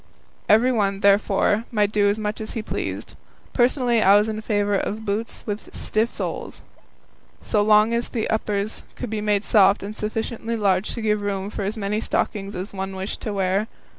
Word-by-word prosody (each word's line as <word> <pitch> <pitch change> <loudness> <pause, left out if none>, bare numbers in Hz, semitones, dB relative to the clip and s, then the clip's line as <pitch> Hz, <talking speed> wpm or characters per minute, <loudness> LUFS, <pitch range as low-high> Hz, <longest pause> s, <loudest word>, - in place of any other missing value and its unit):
Everyone, 215 -4 +3
therefore, 200 +2 +3
might 210 -3 +2
do 205 -1 +3
as 215 +1 -3
he 225 - -3
pleased. - - -4 0.4
Personally 245 -2 +2
I 195 0 +6
was 210 +1 +4
in 215 0 -3
favour 205 -2 0
of 215 +2 -2
boots 210 +2 -3
with 210 -1 -6
stiff 220 +2 +1
soles, - - -5 0.8
so 210 - +1
long 215 +2 +5
as 235 +1 -1
the 225 -3 -2
uppers 210 -1 -1
could 240 - -6
be 215 -1 -2
made 210 -1 +1
soft 200 -3 +4
and 205 +2 -6
sufficiently 225 +2 -3
large 195 -2 +1
to 230 - -5
give 210 -1 +1
room 200 0 -3
for - - -5
as 205 +3 -2
many 210 0 -1
stockings 200 -2 -2
as 185 +3 -5
one 190 0 -4
wished 190 +2 -5
to 215 - -3
wear. 195 +2 0
210 Hz, 175 wpm, -23 LUFS, 200-220 Hz, 0.8 s, I